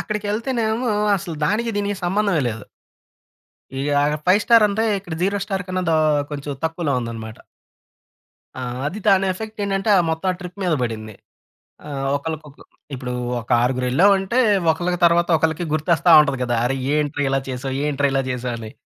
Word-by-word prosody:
అక్కడికె‌ళ్తేనేమో, 220 +3 -1 0.3
అసలు 175 -3 -6
దానికి 230 +6 0
దీనికి 205 -1 -1
సంబంధమే 190 -4 +1
లేదు. 110 -2 -6 1.1
ఈ - - -2 0.2
ఆగర్ 150 +1 0
ఫైవ్ 195 +4 +5
స్టారంటే, 220 -2 +4
ఇక్కడ 175 -4 -7
జీరో 200 +2 +1
స్టార్ 195 -2 -3
కన్నా 185 0 -2
దా 160 - +3 0.4
కొంచెం 145 0 -4
తక్కువలో 160 -3 -1
ఉందన‌మాట. 115 -2 -7 1.2
ఆ! - - -5 0.3
అది 185 +8 -4
దాని 195 -1 +4
ఎఫెక్ట్ 220 +3 -8
ఏంటంటే 195 +1 -1 0.2
మొత్తం 160 +4 -2
ఆ - - -6
ట్రిప్ 180 +2 -9
మీద 170 -3 +2
పడింది. 110 -3 -4 0.7
ఆహ్, 135 -2 -4
ఒకళ్ళకి 155 +2 -4
ఒక 140 - -19 0.4
ఇప్పుడు 125 0 -5 0.3
ఒక 115 - -12
ఆరుగురు 125 +1 0
వెళ్ళామంటే, 195 - +3 0.3
ఒకళ్ళకి 175 +2 -2
తరువాత 170 +1 +3
ఒకళ్ళకి 160 +2 0
గుర్తొస్తా 165 +2 +2
ఉంటది 140 -3 -1
కదా! 120 -1 0
"అరె! 135 - 0 0.2
ఏంట్రా 145 -1 -1
ఇలా 135 0 +1
చేశావ్? 130 +1 -4
ఏంట్రా 140 -1 +1
ఇలా 135 - +2
చేశావు" 125 -1 -3
అని. 110 -1 -8
165 Hz, 155 wpm, -21 LUFS, 135-200 Hz, 1.2 s, ఫైవ్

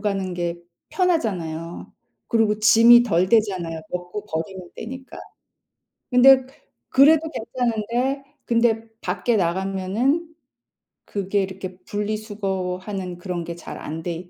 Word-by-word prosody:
가는 195 -3 -2
게 175 -1 -2 0.3
편하잖아요. 180 - -2 0.4
그리고 220 -3 +2
짐이 230 +3 +7
덜 185 -4 +2
되잖아요. 185 -8 +1
먹고 180 +3 -5
버리면 175 +3 -5
되니까. 260 +3 -8 0.9
근데 260 +1 +7 0.4
그래도 295 +4 +6
괜찮은데 240 +2 -2 0.2
근데 230 -1 +1
밖에 185 +6 0
나가면은 195 - 0 0.8
그게 200 0 -1
이렇게 190 -1 -7
분리수거하는 195 -3 -3
그런 175 -1 -4
게 170 0 -6
잘 170 - -9
안 160 +2 -6
돼 175 +1 -5
200 Hz, 250 characters per minute, -23 LUFS, 180-235 Hz, 0.9 s, 짐이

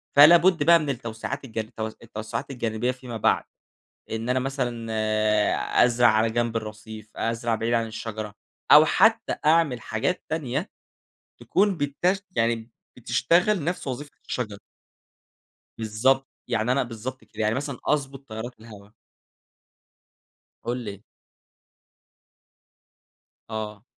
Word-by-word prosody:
فلا 150 +4 +10
بُد 170 -2 +3
بقى 170 +2 +7
من 150 -2 -3
التوسعات 120 +2 -4
الج 115 -4 -11
التو 110 0 -4
التوسعات 110 +2 -6
الجانبية 120 -1 -1
فيما 125 -2 -7
بعد. - - +2 0.7
إن 110 +2 -3
أنا 130 +1 +2
مثلًا 125 -4 -3 0.9
أزرع 120 0 +4
على 110 0 +3
جنب 120 0 -1
الرصيف، 110 0 -9
أزرع 115 0 0
بعيد 115 +2 -1
عن 115 -1 +1
الشجرة، 110 -1 -6 0.4
أو - - +10
حتى - - +3
أعمل 155 -6 +3
حاجات 140 +12 -2
تانية 155 +1 -2 0.7
تكون 200 -1 +1
بتش 155 +7 0 0.2
يعني 115 0 0 0.3
بتشتغل 180 +1 +2
نفس 175 0 -3
وظيفة 140 +3 -5 0.2
الشجرة. 105 -5 -3 1.2
بالضبط، 125 +5 +1 0.2
يعني 120 0 +1
أنا 135 +1 +2
بالضبط 120 +2 -6
كده 110 - -6
يعني 110 +1 +2
مثلًا 140 0 -3
أضبط 135 -2 -1
تيارات 110 +2 -6
الهوا. 105 -3 -13 1.7
قُل 120 +2 -2
لي. 100 -1 -7 2.5
آه. 110 -1 -5
120 Hz, 120 wpm, -25 LUFS, 110-140 Hz, 2.5 s, فلا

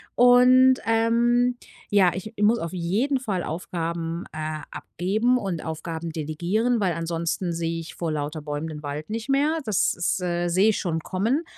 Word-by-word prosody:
Und, 250 +1 +6
ähm, 235 +2 +2 0.3
ja, 195 -3 +4
ich 190 +4 -6
ich 205 - 0
muss 225 +3 +4
auf 165 -4 -4
jeden 205 +11 0
Fall 200 -8 -2
Aufgaben, 165 0 -4
äh, 155 0 -4
abgeben 215 +8 0
und 190 -8 -3
Aufgaben 160 +1 -5
delegieren, 175 +10 -1
weil 190 -4 +1
ansonsten 165 +2 -2
sehe 165 0 -2
ich 165 - -10
vor 165 -2 -3
lauter 150 +1 -3
Bäumen 150 +1 -4
den 150 -1 -8
Wald 145 +3 -5
nicht 225 +4 -4
mehr. 295 +4 +2
Das 210 -4 +2
ist, 175 +1 -1
äh 175 -1 -1
sehe 190 +5 +4
ich 215 - +1
schon 165 -3 -2
kommen. 225 - 0
180 Hz, 170 wpm, -24 LUFS, 165-230 Hz, 0.3 s, Und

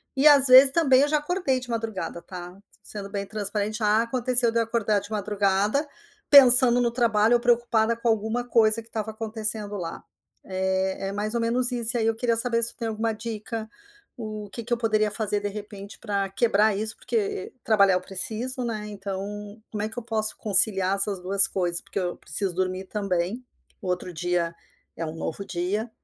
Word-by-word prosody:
E 280 +3 +4
às 280 -2 +7
vezes 260 +1 +8
também 270 -5 +3
eu 290 - +2
já 300 0 +1
acordei 295 -4 -1
de 250 - -9
madrugada, 220 -7 -5
tá? 180 0 -10 0.3
Sendo 200 -2 -7
bem 200 -1 -4
transparente. 210 +1 -3
Já, 215 +1 +2
aconteceu 245 0 +1
de 230 - 0
eu - - +2
acordar 220 -2 0
de 205 - -12
madrugada 205 +6 0 0.4
pensando 250 -3 +9
no 235 -1 0
trabalho 230 -2 +2
ou - - +2
preocupada 235 -2 +1
com 235 - -4
alguma 220 +2 -1
coisa 230 -2 +2
que - - -15
estava 220 -1 -4
acontecendo 215 -1 -2
lá, 170 -2 -7 0.4
eh, 190 0 -2
é - - -5
mais 210 +2 -3
ou 235 - 0
menos 245 +2 +2
isso. 240 0 0
E - - -1
aí 220 - 0
eu 225 - 0
queria 230 -1 -1
saber 230 -1 0
se 230 - +2
tu - - -30
tem 230 -2 -4
alguma 220 +1 -2
dica, 220 0 -6 0.5
o 215 -2 -7
que 235 - -7
que 240 - -11
eu - - 0
poderia 215 -2 0
fazer, 210 -1 -1
de 205 - -4
repente, 205 -1 -9
para 200 -3 -3
quebrar 210 0 +1
isso, 220 +1 -3
porque 415 -1 -3
trabalhar 200 -4 +3
eu 180 - -1
preciso, 230 +7 -4
né, 215 -3 -4
então 205 +1 -7
como 210 -1 -4
é 215 - -3
que 220 - -10
eu 240 - -5
posso 220 -2 +1
conciliar 195 -2 +3
essas 195 -1 +1
duas 195 +2 +5
coisas? 175 -2 -1
Porque - - -6
eu 175 -1 -3
preciso 195 -3 0
dormir 185 +1 -3
também. 195 +3 -3 0.4
O 190 - -7
outro 180 0 -3
dia 170 0 -2 0.4
é 165 - -4
um 155 +1 -7
novo 165 +4 -5
dia 190 +6 -3
215 Hz, 200 wpm, -24 LUFS, 200-235 Hz, 0.5 s, pensando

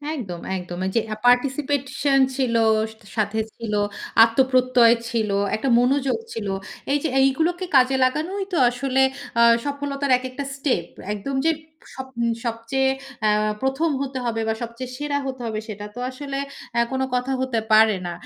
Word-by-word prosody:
একদম, 185 - -6 0.2
একদম। 180 0 -7
এইযে 220 +4 +1
আ - - -4
পার্টিসিপেশন 275 +2 +2 0.2
ছিল, 255 -4 0 0.6
সাথে 215 0 0 0.2
ছিল, 225 -3 -5 0.5
আত্মপ্রত্যয় 250 0 +4
ছিল, 220 -3 -1 0.3
একটা 265 +5 -1
মনোযোগ 270 - +2 0.2
ছিল। 215 -3 -4 0.5
এইযে 290 +1 0
এইগুলোকে 325 +7 +1
কাজে 260 0 +5
লাগানোই 320 +10 0
তো - - +1
আসলে 260 +2 -1 0.4
আ - - +6 0.2
সফলতার 280 -1 -3
এক 255 - -10
একটা 275 +2 -5
স্টেপ। 265 - 0 0.3
একদম 265 +7 -4
যে 325 - +5 0.5
সব 265 0 -6 0.4
সবচেয়ে 235 +4 0 0.4
আ - - +4 0.3
১ম 270 +5 +1
হতে 270 -1 -3
হবে, 225 -1 -1
বা 220 - +1
সবচেয়ে 235 +2 -6
সেরা 290 0 -1
হতে 260 -1 -5
হবে। 215 -1 -2
সেটা 205 -1 -6
তো - - -7
আসলে 275 +1 -6 0.4
আ - - +4
কোনো 265 0 0
কথা 250 +2 -1
হতে 255 -3 0
পারে 215 -1 +6
না। - - -3
260 Hz, 150 wpm, -23 LUFS, 230-275 Hz, 0.6 s, আ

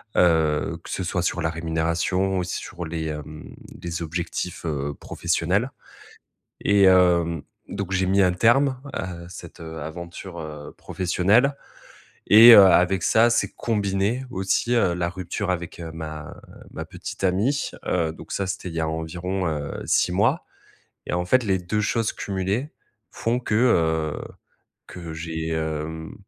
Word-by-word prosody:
heu, 80 -1 +2
que - - -11
ce 95 - -2
soit 90 0 -1
sur 90 - -1
la 80 - 0
rémunération 85 +4 -1
ou - - +1
aussi 90 - -3
sur 90 -3 -7
les, 80 0 -4
hem, 75 0 -7 0.3
les 85 -1 -4
objectifs, 85 +2 -4
heu, 70 -2 -2
professionnels. 90 - -1 0.9
Et 100 -1 +4
heu, 85 -4 +3 0.3
donc, 100 -1 -4
j'ai 95 0 +1
mis 100 +1 +3
un 90 -1 +4
terme 130 +7 +3
à 90 -2 -5
cette, 90 0 -11
heu, 80 -1 -7
aventure, 85 +3 -8
heu, 75 -2 -8
professionnelle. 105 +10 +2 0.7
Et 115 +3 +10
heu, 100 - +10
avec 90 0 +4
ça, 115 +2 +4
s'est - - +1
combiné 105 +3 0
aussi, 95 +5 0
heu, 100 -7 +3
la 85 0 -1
rupture 95 +2 -4
avec 90 -2 -4
ma 80 -2 -7 0.4
ma - - -5
petite - - -8
amie. 105 +11 +1 0.2
Heu, 85 -3 0
donc - - -11
ça, 100 - -1
c'était 95 0 -4
il 80 - -8
y 80 - -1
a 80 - 0
environ, 85 +4 -3
heu, 75 -2 -4
6 - - +2
mois. - - +2 0.6
Et - - -4
en 90 0 0
fait, 130 +6 +3
les 95 -3 +1
2 105 +5 -1
choses 115 +1 0
cumulées 100 +9 -3 0.4
font 120 +2 -1
que, 120 - -4
heu, 80 -10 +2 0.7
que 85 -3 -8
j'ai, 80 0 -4
hem, 80 0 -3
90 Hz, 155 wpm, -24 LUFS, 80-95 Hz, 0.9 s, Et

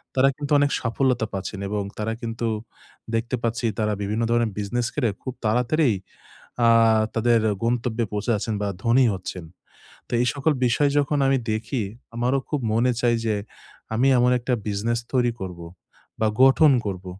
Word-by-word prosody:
তারা 130 +1 +5
কিন্তু 145 0 -6
অনেক 145 0 +2
সাফল্যতা 120 0 0
পাচ্ছেন 95 +1 -5
এবং 105 -1 -1
তারা 110 +1 -2
কিন্তু 115 0 -3 0.7
দেখতে 120 +3 -1
পাচ্ছি 115 +1 -1
তারা 105 -1 +1
বিভিন্ন 105 +3 -1
ধরনের 120 -2 +2
বিজনেস 120 +4 -1
করে 125 -7 +1
খুব 130 - -5
তাড়াতাড়িই 125 +3 +2 0.7
আ - - +6 0.5
তাদের 115 +1 +3 0.2
গন্তব্যে 115 0 0
পৌঁছে 105 +3 -3
যাচ্ছেন 110 +1 -2
বা 105 - 0 0.2
ধনী 120 +2 +4
হচ্ছেন। 95 -2 -6 0.6
তো - - -16
এই - - +2
সকল 145 +2 +1
বিষয় 140 +4 +2
যখন 145 +1 +1
আমি 135 0 +3
দেখি, 110 +3 -2 0.3
আমারও 125 +3 +1
খুব 150 - -1
মনে 120 +3 +3
চায় 120 -1 +3
যে 110 -2 +1 0.6
আমি 125 +4 +2
এমন 125 +1 +4
একটা 125 +1 -2
বিজনেস 110 +3 -1
তৈরি 120 -2 +2
করব 90 -2 -6 0.6
বা 110 - +2 0.2
গঠন 140 +3 +6
করব। 95 -2 -4
120 Hz, 160 wpm, -24 LUFS, 110-130 Hz, 0.7 s, আ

